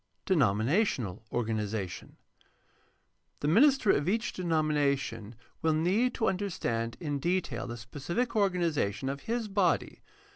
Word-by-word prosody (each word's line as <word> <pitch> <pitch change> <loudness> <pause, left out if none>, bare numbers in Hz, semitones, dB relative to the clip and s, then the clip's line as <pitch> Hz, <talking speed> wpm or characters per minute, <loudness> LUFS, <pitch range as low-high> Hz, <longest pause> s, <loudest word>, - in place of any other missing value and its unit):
Denominational 125 - +1
organization. 105 -5 -3 0.6
— - - -41
The 145 - 0
minister 250 - +5
of 145 +5 +1
each 225 +4 0
de 185 - -5
nomination 140 - 0 0.3
will 160 -1 +2
need 195 +11 +2
to 225 - 0
understand 120 - -2
in 145 -4 -2
detail 175 -3 -1
the 120 0 -6
specific 150 - -3
organ 190 -4 +2
ization 135 -5 0
of 140 - -7
his 230 -1 -1
body. 195 -4 0
155 Hz, 125 wpm, -30 LUFS, 115-190 Hz, 0.6 s, minister